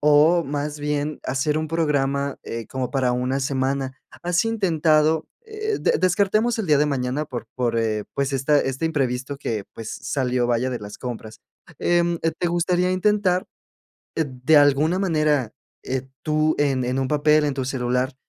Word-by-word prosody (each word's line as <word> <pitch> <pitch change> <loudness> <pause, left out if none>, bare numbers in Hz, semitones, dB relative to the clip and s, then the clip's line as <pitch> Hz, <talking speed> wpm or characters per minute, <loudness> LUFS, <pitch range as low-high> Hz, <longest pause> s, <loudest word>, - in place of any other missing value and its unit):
o 150 +4 +5
más 145 +1 -3
bien, 150 +1 -2
hacer 135 +3 0
un 155 - -3
programa, 140 -4 0
eh, 115 -1 -6
como 130 -2 -3
para 130 -2 +1
una 125 +2 0
semana. 135 0 -1 0.3
¿Has 175 +2 +2
intentado? 160 -7 +2 0.2
eh, 430 -1 -3
de - - +2
descartemos 205 +6 +2
el 215 - -2
día 150 -3 +4
de 150 - +3
mañana, 135 +1 -1
por 120 -6 -6
por, 120 -2 0
eh, 110 -2 0
pues, 140 0 -1
esta 135 +2 +3
este 135 +4 -2
imprevisto 135 -3 -1
que, 110 -7 -3
pues, 115 -1 -6
salió, 125 -3 0
vaya, 120 +2 +1
de 125 - -4
las 105 0 -9
compras. 110 -3 -7 0.4
Em, 175 0 +2
eh, 165 - +1
¿te 175 - 0
gustaría 175 +1 +1
intentar, 185 -1 +2 0.7
eh, 160 - +2
de 130 +3 +2
alguna 145 +5 +4
manera, 155 - +1 0.3
eh, 130 0 -3
tú 155 0 +2
en 135 -3 +1
en 125 +2 -1
un 130 - -1
papel, 150 0 +3
en 145 -2 0
tu 135 -1 -2
celular, 125 0 -1
145 Hz, 170 wpm, -23 LUFS, 130-160 Hz, 0.7 s, o